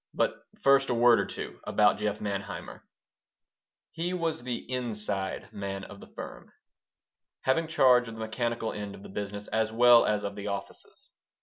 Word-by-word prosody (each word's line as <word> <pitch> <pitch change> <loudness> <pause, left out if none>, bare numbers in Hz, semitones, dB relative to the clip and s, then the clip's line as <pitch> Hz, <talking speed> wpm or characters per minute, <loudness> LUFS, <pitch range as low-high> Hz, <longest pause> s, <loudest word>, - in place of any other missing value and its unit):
But - - -1 0.2
first 135 0 +5
a 120 - +1
word 120 0 +6
or - - 0
two - - -7
about - - +3
Jeff 105 -1 -1
Manheimer 100 0 -5 1.1
He 175 +3 -2
was 165 -2 -1
the 125 0 -3
"inside 105 -6 -3
man" 95 -1 -4
of 100 - -10
the - - -12
firm, - - -9 0.9
having 160 +5 +1
charge 125 -6 +5
of 115 - -7
the - - -10
mechanical 115 0 -2
end 105 -1 -6
of 95 - -13
the - - -10
business 100 +1 -5
as 110 0 0
well 120 +1 +7
as 105 -1 +1
of 100 - -3
the 100 0 -6
offices. 100 -1 -7
110 Hz, 170 wpm, -29 LUFS, 100-125 Hz, 1.1 s, well